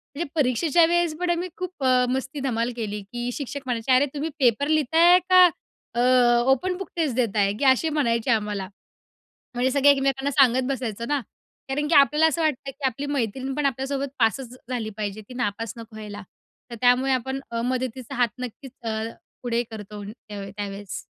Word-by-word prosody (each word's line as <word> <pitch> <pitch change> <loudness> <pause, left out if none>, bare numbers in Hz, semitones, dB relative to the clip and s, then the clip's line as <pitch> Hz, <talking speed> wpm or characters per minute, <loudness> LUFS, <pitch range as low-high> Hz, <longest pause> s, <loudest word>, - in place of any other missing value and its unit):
म्हणजे 340 +4 -3
परीक्षेच्या 295 +4 +3
वेळेस 345 -1 +1
पण 360 0 -1
आम्ही 345 +1 0
खूप 365 -5 -6
अ, 255 -1 +4
मस्ती 265 +3 -3
धमाल 240 -2 -1
केली 210 -3 -4
की 240 +5 -5
शिक्षक 280 +1 -5
म्हणायचे, 245 0 -1
"अरे 255 +3 +5
तुम्ही 300 +2 -3
पेपर 255 +1 +3
लिहित 310 -1 +1
आहे 350 +2 +7
का? 365 0 +8 0.5
अ, 240 - +2 0.5
ओपन 360 +7 0
बुक 390 - -7
टेस्ट 310 -8 0
देताय?" 210 -5 +1
ते - - 0
असे 290 +5 +1
म्हणायचे 245 -5 +1
आम्हाला. 210 -3 -1 0.9
म्हणजे 250 +2 +1
सगळे 280 +1 +5
एकमेकांना 275 0 +1
सांगत 260 -2 +4
बसायचं 235 -4 -3
ना. 290 -1 +1 0.5
कारण 295 +2 -1
की 325 - +2
आपल्याला 300 +2 +5
असं 320 +1 0
वाटत, 310 -2 +2
की 275 +1 -8
आपली 265 +3 -3
मैत्रीणपण 270 +1 -2
आपल्यासोबत 270 +1 -2
पासच 245 +2 0
झाली 235 -4 -2
पाहिजे. 210 -1 -4
ती 250 - -10
नापास 230 -2 -2
नको 230 -1 -11
व्हायला. 210 -1 -8 0.5
तर 235 - -6
त्यामुळे 250 +2 +4
आपण 265 +1 -1
अ, 230 0 -2
मदतीचा 255 0 -3
हात 245 -1 +3
नक्कीच 250 +1 -7 0.2
अ, 220 -1 -1 0.4
पुढे 240 -1 0
करतो 210 -1 -8
अ, 205 - -7 0.4
त्यावेळेस. 200 -2 -5
260 Hz, 175 wpm, -24 LUFS, 230-285 Hz, 0.9 s, का